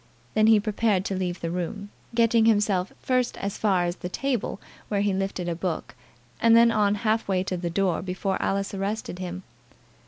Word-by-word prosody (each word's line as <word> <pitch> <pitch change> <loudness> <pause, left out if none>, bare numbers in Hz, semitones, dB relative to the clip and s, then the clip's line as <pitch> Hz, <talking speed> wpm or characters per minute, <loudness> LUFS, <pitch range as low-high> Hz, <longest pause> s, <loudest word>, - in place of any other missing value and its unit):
Then 215 0 +4
he 220 -1 +7
prepared 205 -2 0
to 195 - -2
leave 180 -1 -3
the 165 - -2
room, 200 +4 -4 0.2
getting 230 -1 +4
himself 205 -4 +2
first 255 -1 +1
as 200 0 -4
far 190 -4 +2
as 175 +1 -3
the 180 - -5
table, 250 -2 -2 0.3
where 200 -1 0
he 205 -1 +1
lifted 190 -2 -2
a 170 - 0
book, 170 -1 -4 0.5
and 230 0 +6
then 235 0 +6
on 210 -2 +2
half 220 +1 +1
way 185 -2 +1
to 190 - -3
the 175 -1 -3
door 180 -1 0
before 190 +1 -2
Alice 195 +1 -1
arrested 195 -1 -3
him. 185 0 -5
195 Hz, 190 wpm, -26 LUFS, 185-215 Hz, 0.5 s, he